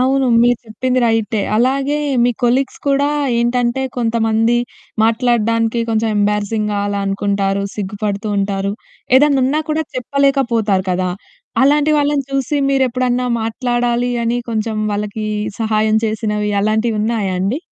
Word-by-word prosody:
అవును. 265 +1 +2 0.2
మీరు 240 -1 +3
చెప్పింది 255 +4 -1
రైటే. 225 -2 +1 0.2
అలాగే 270 +4 +1 0.3
మీ 245 - +3
కొలిగ్స్ 255 +3 +1
కూడా 280 +1 +2 0.3
ఏంటంటే 240 +1 0
కొంతమంది 225 0 +1 0.5
మాట్లాడడానికి 230 0 +1
కొంచెం 225 0 +1
ఎంబారిసింగ్‌గా 210 0 0
అలా 200 0 -2
అనుకుంటారు, 200 0 0
సిగ్గుపడుతూ 205 +1 -3
ఉంటారు. 195 0 -1 0.4
ఏదనున్నా 280 +1 +3
కూడా 315 +1 0
చెప్పలేకపోతారు 245 -7 +1
కదా! 180 0 0 0.5
అలాంటి 295 +2 +3
వాళ్ళని 290 -1 +1
చూసి 275 +1 -1
మీరెప్పుడన్నా 255 -2 +1 0.2
మాట్లాడాలి 240 +1 -1
అని 235 +1 0
కొంచెం 220 -1 -2 0.2
వాళ్ళకి 210 +1 -3 0.3
సహాయం 215 -1 +1
చేసినవి 210 -1 -2
అలాంటివున్నాయా 215 -2 0
అండి? 200 +9 0
230 Hz, 110 wpm, -17 LUFS, 210-255 Hz, 0.5 s, మీరు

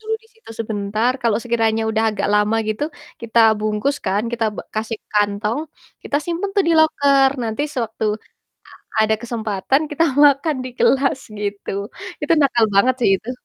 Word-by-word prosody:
dulu 440 0 -5
disitu 450 - -18
sebentar, 215 +2 -1
kalau 230 -3 +2
sekiranya 225 -2 +1
udah 220 0 +1
agak 200 -1 -2
lama 210 +2 +2
gitu, 215 +6 -1 0.4
kita 230 0 0 0.2
bungkus 215 +6 -1
kan 195 +2 +1
kita 235 -1 -1
b - - -13
kita - - -18
kasih 220 0 -2
kantong, 210 +4 0 0.4
kita 285 - -1
simpan 350 +4 -2
tuh 400 - +5
di - - +4
loker, 280 -3 +4
nanti 225 +4 -2
sewaktu 225 -4 -3 0.9
a - - -7
ada 220 0 +2
kesempatan 225 +3 -1
kita 300 +3 +2 0.2
makan 290 +2 +3
di - - -4
kelas 270 0 +3 0.2
gitu. 205 -1 -4 0.5
Itu - - +1
nakal 240 -4 +3
banget 250 +6 +4
sih 225 - +4
itu. 220 +6 -8
230 Hz, 165 wpm, -20 LUFS, 215-275 Hz, 0.9 s, tuh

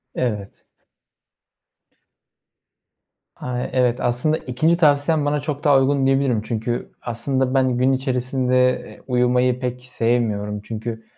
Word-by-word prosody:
Evet. 105 -5 -3 2.7
A, 125 -1 -5
evet. 125 -1 +1
Aslında 125 +6 +1
2'nci 155 +6 0
tavsiyen 150 -1 +3
bana 145 0 +1
çok 145 0 -4
daha 145 -3 +5
uygun 135 0 +2
diyebilirim. 135 -4 +2
Çünkü 115 +2 -3
aslında 130 +2 -2
ben 130 -2 +2
gün 130 +2 +3
içerisinde, 130 -1 +1
eee, - - -13
uyumayı 125 0 +2
pek 125 -1 -4
sevmiyorum. 115 -4 -1
Çünkü 115 +1 -6
125 Hz, 115 wpm, -21 LUFS, 120-135 Hz, 2.7 s, daha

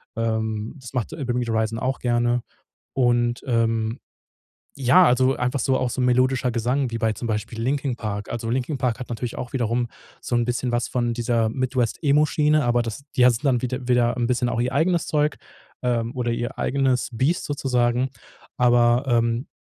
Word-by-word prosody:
Ähm, 110 0 -2
das 130 0 -11
macht 125 -4 -1
„Bring 125 -4 -3
Me 125 - 0
the 115 - -3
Horizon“ 110 0 0
auch 130 +3 -1
gerne. 120 0 +1 0.5
Und, 120 -2 +1
ähm, 115 -1 0 0.8
ja, 135 +8 +5
also 130 +2 +3
einfach 125 +2 -1
so 130 +2 +2
auch 130 - 0
so 130 - -4
melodischer 125 +1 +2
Gesang 125 +3 0
wie 115 - -2
bei 115 -1 +1
zum 115 +2 -5
Beispiel 110 +1 -3
„Linkin 135 0 -1
Park“. 105 -2 -4
Also 115 -1 -4
„Linkin 130 +3 -1
Park“ 120 -3 -1
hat 125 - -7
natürlich 120 0 -4
auch 125 - -5
wiederum 120 -1 0 0.3
so - - -5
'n 120 0 +2
bisschen 125 +1 -1
was 120 0 0
von 120 -1 -1
dieser 115 -1 +1
Midwest 125 -2 -1
Emo-Schiene, 150 +1 +3
aber 120 0 +2
das 115 +4 -5
die 125 - +6
hatten 120 -3 +4
dann 130 -4 +2
wiede 125 0 -4
wieder 120 -1 +3
'n 120 -1 0
bisschen 125 -1 +1
auch 115 0 -1
ihr 125 - -1
eigenes 170 0 +1
Zeug, 150 0 +1 0.5
ähm, 120 -1 -1
oder 120 -2 -1
ihr 120 +1 -3
eigenes 130 -2 +1
Biest 135 +9 0
sozusagen. 125 -2 0 0.5
Aber, 120 0 +4
ähm, 115 +1 +1
120 Hz, 185 wpm, -23 LUFS, 115-130 Hz, 0.8 s, die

